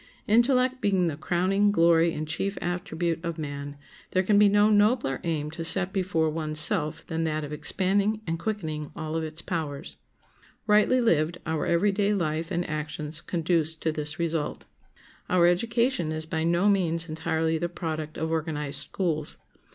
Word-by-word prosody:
Intellect 255 +3 +3
being 190 -5 +2
the 160 -4 -1
crowning 185 +6 +1
glory 170 -3 +4
and 155 -1 -5
chief 195 +6 -2
attribute 175 -2 -3
of 170 -1 -4
man, 145 -2 -6 0.4
there 185 - +2
can 205 +2 +3
be 210 -1 +6
no 205 +1 +4
nobler 210 - +2
aim 155 -3 -2
to 165 +1 -6
set 190 +3 +3
before 180 -5 0
one's 155 -1 0
self 155 0 +3
than 165 0 -3
that 155 -1 -2
of 145 - -7
expanding 195 +7 +1
and 165 0 -3
quickening 160 -7 -4
all 160 -1 -5
of 165 - -1
its 155 0 -4
powers. 155 -5 -5 0.7
Rightly 215 +4 +4
lived 170 -6 +1
our 160 -1 -2
every 170 +5 +2
day 205 +1 +1
life 165 -2 -2
and 175 +1 -2
actions 155 0 -3
conduce 165 -2 -1
to 160 0 -2
this 150 +1 -3
result. 165 -2 -2 0.6
Our 180 -1 +4
education 230 +1 +1
is 155 0 -2
by 160 0 -2
no 170 +4 +2
means 170 -4 +1
entirely 160 0 -1
the 175 +1 -2
product 160 -3 -5
of 160 +1 -2
organized 150 -3 0
schools. 155 -5 -2
165 Hz, 165 wpm, -26 LUFS, 155-190 Hz, 0.7 s, be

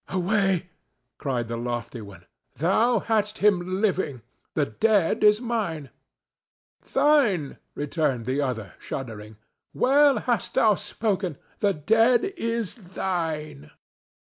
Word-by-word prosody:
"Away!" 190 -1 0 0.5
cried 125 -4 -2
the 115 0 -4
lofty 120 0 -4
one. 100 -4 -12 0.3
"Thou 215 - +2
hadst 215 -1 0
him 185 -2 +2
living; 180 - 0 0.3
the 150 - +2
dead 195 - +1
is 210 0 +6
mine." 210 - -3 1.0
"Thine!" 235 - +2 0.2
returned 145 -5 -1
the 130 +3 0
other, 110 -8 -3
shuddering. 110 -4 -7 0.4
"Well 280 0 +4
hast 230 -2 -1
thou 220 -2 +5
spoken; 190 -6 -2 0.2
the 200 -2 +2
dead 225 - +3
is 230 - -2
thine." 165 - -4
180 Hz, 110 wpm, -25 LUFS, 135-220 Hz, 1.0 s, is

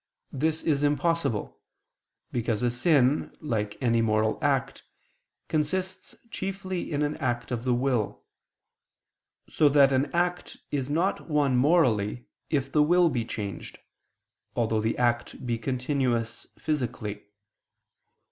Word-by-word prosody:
This 155 +3 -1
is 145 -3 +1
impossible: 145 -5 0 0.7
because 115 -2 -1
a 120 - +2
sin, 135 +2 +2
like 110 -8 -2
any 115 -1 +3
moral 110 -1 +1
act, - - 0 0.7
consists 185 +5 -2 0.2
chiefly 190 -3 -4
in 150 0 0
an 150 +1 -1
act 120 -2 -2
of 120 0 -3
the 125 - +2
will: 125 -4 -1 1.2
so 150 - +3
that 140 -1 +5
an 135 +1 +1
act 175 +1 -1
is 140 -2 -2
not 170 +4 0
one 145 -4 +2
morally, 125 - +2 0.2
if 135 -3 0
the 150 - +4
will 175 +3 +4
be 125 -5 -1
changed, 100 -5 -6 0.8
although 110 -2 +1
the 110 +1 -1
act 120 0 0
be 120 -2 -1
continuous 125 -2 -1
physically. 115 -9 -3
130 Hz, 120 wpm, -27 LUFS, 115-155 Hz, 1.2 s, that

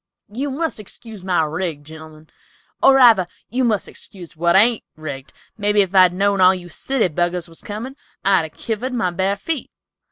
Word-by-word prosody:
"You 275 +5 -2
must 305 -1 -3
excuse 215 -1 -10
my 180 -3 +1
rig, 160 -1 -3
gentlemen, 155 0 -13 0.5
or 270 0 +6
rather, 230 -9 +6 0.2
you 255 +2 0
must 220 -5 0
excuse 180 -7 -12
what 170 +2 +2
ain't 225 +3 +4
rigged; 140 -4 -8 0.3
mebby 205 0 +3
if 190 0 -7
I'd 185 -2 +6
known 200 +1 +1
all 185 +1 +6
you 175 -1 -8
city 260 +6 -1
buggers 175 +1 -2
was 165 -1 -14
comin', 225 +6 -7 0.3
I'd 195 -4 +3
a - - -8
kivered 230 +9 -4
my 225 -7 0
bar 190 +3 0
feet." 310 +7 -4
190 Hz, 180 wpm, -20 LUFS, 170-225 Hz, 0.5 s, or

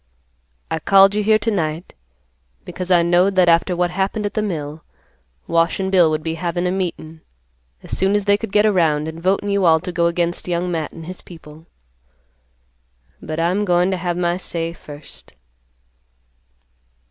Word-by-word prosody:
I 160 - -1
called 195 +4 +5
you 210 - 0
here 215 +1 +4
to 220 +1 -2
night, 160 -3 -3 0.7
because 180 +1 -6
I 175 -2 +4
knowed 175 +3 +2
that 185 -1 +4
after 170 +2 +3
what 175 0 0
happened 195 +3 -2
at 205 - -3
the 215 - -1
mill, 155 -6 -5 0.6
Wash 165 +2 +1
and 190 0 -2
Bill 180 -4 +5
would 155 0 -2
be 160 0 -2
havin' 175 +1 -3
a 180 - 0
meetin' 165 -4 -4 0.6
as - - -5
soon 195 +2 +1
as 205 -1 0
they 205 0 +4
could 210 0 -6
get 210 +1 +3
around, 160 -7 +2
and 160 +1 -7
votin' 195 +3 0
you 200 -1 +1
all 160 -2 +5
to 180 +1 -5
go 170 0 +1
against 170 +1 -1
Young 175 0 -1
Matt 160 -3 -3
and 165 - -10
his 185 +2 -8
people. 160 -1 -14 1.5
But 155 +1 -5
I'm 180 +5 +1
goin' 180 -1 +2
to 190 - -1
have 175 -1 -3
my 175 0 0
say 170 -2 -4
first." 145 - -12
175 Hz, 180 wpm, -20 LUFS, 165-190 Hz, 1.5 s, called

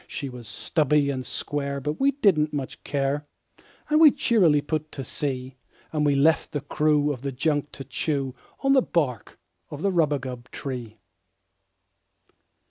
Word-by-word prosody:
She 140 - -5
was 125 -3 -10
stubby 145 +4 +1
and 130 -2 -3
square, 140 +1 -3
but 150 +3 -3
we 275 - +4
didn't 195 - +2
much 140 -3 -5
care, 140 +1 -1 0.6
And 305 +1 +3
we 315 - +10
cheerily 215 - +3
put 155 +1 -3
to 135 - -5
sea; 130 0 -3 0.4
And 150 -1 +1
we 145 -1 +3
left 155 +3 +3
the 145 - -1
crew 150 0 +2
of 125 - -9
the 140 0 -3
junk 145 +2 0
to 135 - -7
chew 135 0 -2 0.3
The 275 -1 +5
bark 140 - -2 0.3
of 150 +1 -7
the 200 - +2
rubagub 135 -7 -1
tree. 120 -5 -6
145 Hz, 150 wpm, -25 LUFS, 135-155 Hz, 0.6 s, we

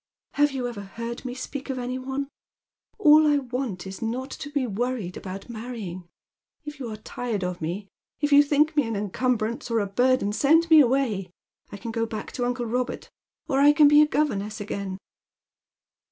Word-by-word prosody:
" - - -50
Have 295 0 +5
you 260 -2 -2
ever 235 -4 -6
heard 230 +5 -6
me 250 -1 -4
speak 270 +1 -6
of 265 - -2
any 250 +1 -3
one? 270 +2 -3 0.7
All 310 -6 +6
I 295 -1 +4
want 250 -8 -4
is 190 0 -8
not 250 +4 -3
to 285 - -7
be 285 -3 -1
worried 230 -4 -3
about 190 +1 -6
raaiTj 235 +3 -7
ing. 180 -4 -7 0.6
If 295 -1 -8
you 250 -4 -5
arc 215 -1 -8
tired 230 -6 -3
of 180 -1 -3
me, 180 +6 -4 0.3
if 290 -1 +1
you 285 - +9
think 295 +2 +2
me 290 -6 +2
an 225 - -2
encumbrance, 225 +3 -1
or 230 - +1
a 205 - 0
burden, 245 +1 +2
send 325 +7 +3
me 315 - +9
away. 240 -8 +2 0.4
I 205 - -7
can 230 +3 -6
go 230 0 -1
back 215 -1 -6
to 245 - -2
uncle 245 0 -2
Kobert, 250 +2 -3 0.4
or 270 -3 +1
I 290 +1 +7
can 295 -1 +6
be 295 +1 +7
a 300 - +5
governess 220 -8 -1
again." 200 -2 -4
245 Hz, 195 wpm, -25 LUFS, 210-280 Hz, 0.7 s, you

